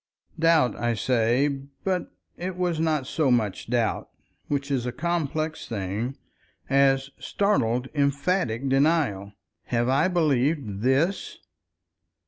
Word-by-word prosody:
Doubt, 160 -7 +4
I 120 +1 0
say, 120 +4 +2 0.4
but 185 -2 -1 0.2
it 180 +1 -5
was 175 -3 0
not 155 -4 +1
so 150 +1 0
much 110 -4 0
doubt—which 135 +4 -3
is 125 -3 0
a - - -1
complex 155 +1 -2
thing—as 135 +6 -1
startled 130 - 0
emphatic 140 -2 0
denial. 135 - +1 0.3
"Have 120 0 0
I 140 +7 +3
believed 140 - 0
_this! 140 - +1
135 Hz, 105 wpm, -25 LUFS, 120-160 Hz, 0.4 s, Doubt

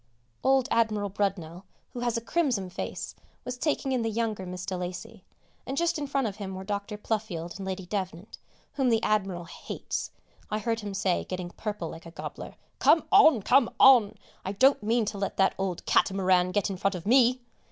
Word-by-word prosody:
Old 265 -1 +3
Admiral 215 -3 +1
Brudnell, 185 -3 -2 0.3
who 245 - -5
has 240 -1 0
a - - -3
crimson 235 - 0
face, - - -5 0.3
was 250 0 -4
taking 275 0 -1
in 255 -2 +1
the 225 - 0
younger 220 -4 -2
Miss 180 0 -6
de 190 - -3
Lacy, 185 +4 -6 0.4
and 270 +2 -5
just 340 -1 +1
in 290 - -3
front 275 -2 0
of 205 -2 -4
him 190 -3 -5
were 190 - -6
Dr. 205 +1 -4
Pluffield 205 -6 -3
and 190 - -5
Lady 190 -1 -4
Devnant, 185 0 -5 0.3
whom 270 -3 +1
the 225 -1 +2
Admiral 195 -5 0
hates. 165 - -5 0.4
I 215 - -1
heard 225 +1 -1
him 205 -2 -6
say, 190 -2 +1
getting 180 -1 -5
purple 205 -6 -4
like 165 +1 -10
a - - -10
gobbler, - - -8 0.2
"Come 330 - +5
on, 315 - +6
come 275 - +4
on, 250 -6 +7 0.3
I 190 - -3
don't 265 +6 +4
mean 225 +2 +1
to 205 -1 -4
let 195 - -3
that 195 - +3
old 190 -3 -3
catamaran 185 -3 +3
get 200 +1 0
in 190 - -4
front 195 +1 0
of 180 0 -7
me!" 250 +2 +4
205 Hz, 195 wpm, -28 LUFS, 185-235 Hz, 0.4 s, on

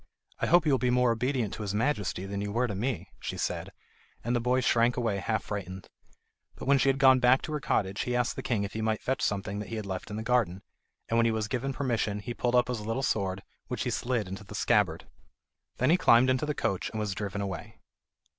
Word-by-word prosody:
"I - - 0
hope 175 0 +5
you 150 - +3
will 135 - +3
be 125 - +1
more 125 -1 +3
obedient 120 -2 -1
to - - -6
his 100 -1 -3
Majesty 105 -6 -1
than 100 0 -4
you 100 0 -3
were 120 +4 +1
to 110 - -3
me," 115 +4 -3
she - - -5
said; - - -3 0.5
and 120 +2 0
the - - +2
boy 125 +2 +1
shrank 120 0 +3
away 115 -5 0
half 110 +2 -1
frightened. 95 -2 -6 0.7
But - - -8
when 140 0 +5
she 135 - +3
had 135 - +2
gone 130 -1 +6
back 125 +2 +4
to - - -5
her 150 - -1
cottage, 100 -7 0
he 125 - -1
asked 120 -1 0
the - - -4
king 115 -5 0
if 100 - -5
he 110 - -3
might 110 -1 -1
fetch 130 0 -1
something 100 0 -1
that 105 -3 -6
he - - -4
had 110 -2 -4
left 95 -1 -5
in 105 - -5
the 110 - -4
garden, 110 -6 +1 0.4
and 115 - +2
when 115 - +4
he - - +2
was 110 -1 -1
given 130 +3 -2
permission, 120 -7 -1
he 105 +4 -5
pulled 120 +1 0
up 125 0 +4
his 125 -3 -3
little 115 +5 -2
sword, 95 -5 -1 0.2
which - - -3
he - - -1
slid 120 -5 -1
into 95 +2 -7
the - - -10
scabbard. - - +2 0.7
Then 130 +5 +3
he 175 - +5
climbed 130 -5 +5
into 130 +3 0
the 150 - -1
coach 95 -6 -1
and 110 - -5
was 105 -2 -1
driven 100 0 -4
away. 95 -2 -5
115 Hz, 250 wpm, -29 LUFS, 100-125 Hz, 0.7 s, gone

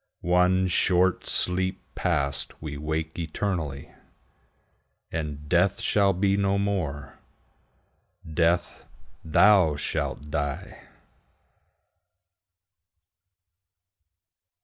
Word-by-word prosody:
One 90 +2 +3
short 90 0 +2
sleep 95 +1 +1
past, 70 -6 -2
we 75 -2 -6
wake 80 +2 -4
eternally, 80 -4 -3 1.2
And 75 -2 -5
Death 90 +4 +2
shall 100 -2 +2
be 95 +1 +1
no 100 0 +1
more: 85 -9 -3 1.1
Death, 85 +2 0 0.4
thou 90 -1 +4
shalt 75 +1 -4
die! 70 -3 -4
85 Hz, 70 wpm, -26 LUFS, 75-95 Hz, 1.2 s, thou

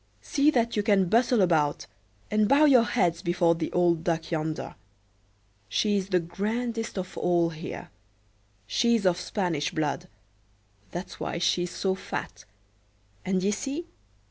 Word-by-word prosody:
"See 285 +1 +3
that 235 -5 +1
you 210 - +2
can 200 -4 +2
bustle 235 0 +3
about, 155 -5 +1 0.5
and 215 0 +2
bow 285 +2 +6
your 255 -5 +6
heads 175 -9 +1
before 175 -2 +2
the 165 -1 -4
old 170 -2 +2
Duck 165 -1 -1
yonder. 155 -1 -3 1.0
She's 200 -3 0
the 185 -2 +3
grandest 225 +6 -3
of 185 0 -5
all 170 -1 +2
here; 160 +1 -7 0.8
she's 230 - +1
of 180 -1 +3
Spanish 175 -6 -1
blood—that's 105 - -7
why - - -3
she's 175 +1 +1
so 190 +2 -1
fat; 190 - -6 0.8
and 185 0 0
d'ye 200 +2 +1
see? 280 +10 -3
180 Hz, 135 wpm, -27 LUFS, 165-215 Hz, 1.0 s, bow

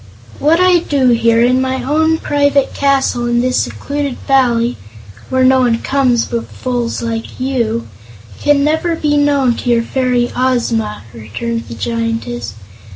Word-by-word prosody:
"What 315 +4 +3
I 365 -1 +4
do 280 -5 +1
here, 230 -1 +3
in 255 +1 +3
my 260 -1 -2
own 315 +4 +1
private 285 -2 +1
castle 270 -3 +1
in 240 0 +1
this 255 0 0
secluded 285 -2 -3
Valley 245 -3 +2 0.5
where 260 0 +1
no 260 0 +5
one 240 -3 +2
comes 255 -3 +1
but 235 -1 -4
fools 245 -2 -3
like 230 +1 -5
you 235 -3 -1 0.5
can 290 -1 +2
never 320 +3 0
be 300 -2 0
known 285 -4 +2
to 245 - -4
your 235 -1 +3
fairy 250 -1 0
Ozma," 235 - -1
returned 115 +1 -5
the 115 - -8
Giantess. 230 - -3
255 Hz, 150 wpm, -15 LUFS, 230-280 Hz, 0.5 s, no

